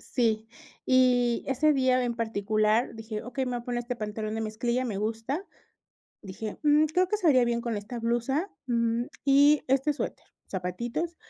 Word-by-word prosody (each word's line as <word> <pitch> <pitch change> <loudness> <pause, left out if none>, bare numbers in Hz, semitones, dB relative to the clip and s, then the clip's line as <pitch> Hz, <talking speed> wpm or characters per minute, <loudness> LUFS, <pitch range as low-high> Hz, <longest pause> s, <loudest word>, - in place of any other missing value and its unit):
Sí, 225 -3 +1 0.4
y 250 -2 +3
ese 295 +3 +2
día 255 -1 +3
en 235 -1 -2
particular 215 +1 +1
dije: 220 -1 -6
"Okey, 250 +2 -3
me 250 - -3
voy 245 - -1
a - - -11
poner 240 -1 -2
este 245 0 -4
pantalón 215 0 -4
de - - -2
mezclilla, 235 +3 -1
me 215 -5 -3
gusta", 225 - -2 0.8
dije: 205 +1 -6
"Mm, 300 +1 +5
creo 360 +4 +2
que 425 - 0
se 365 -6 +1
vería 255 -4 +5
bien 235 0 0
con 230 -2 -3
esta 210 +4 -6
blusa, 240 - 0 0.2
mm, 235 -1 +1 0.2
y 285 +1 +5
este 270 +3 +2
suéter, - - -5 0.2
zapatitos", 235 - -3
240 Hz, 175 wpm, -28 LUFS, 220-265 Hz, 0.8 s, Mm